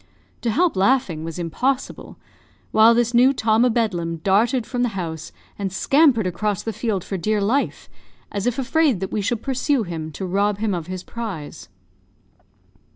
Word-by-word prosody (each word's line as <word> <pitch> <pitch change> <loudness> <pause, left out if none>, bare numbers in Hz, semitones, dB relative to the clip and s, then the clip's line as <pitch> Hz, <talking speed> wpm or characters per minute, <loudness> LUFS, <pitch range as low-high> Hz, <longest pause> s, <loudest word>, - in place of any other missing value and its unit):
To 235 - -1
help 335 +9 +2
laughing 190 -5 +1
was 165 0 -6
impossible; 250 - -2 0.5
while 225 +2 +6
this 240 0 +1
new 250 +3 +5
Tom 225 -2 +2
o' 250 - +4
Bedlam 180 -8 -1
darted 220 +5 +2
from 245 +2 -3
the 230 -5 -1
house, 160 -3 -5 0.3
and 195 -2 -2
scampered 270 - +3
across 190 +2 -2
the 225 - -3
field 210 -4 -2
for 195 - -4
dear 215 +4 0
life, 235 +8 -1 0.4
as 200 +2 -2
if 245 - 0
afraid 275 - +2
that 190 - -4
we 210 - -1
should 225 +2 -2
pursue 270 -1 0
him, 160 -4 -5
to 190 - -5
rob 200 +2 +1
him 210 -1 -1
of 170 -2 -4
his 185 0 -6
prize. 195 - -7
215 Hz, 170 wpm, -22 LUFS, 185-245 Hz, 0.5 s, while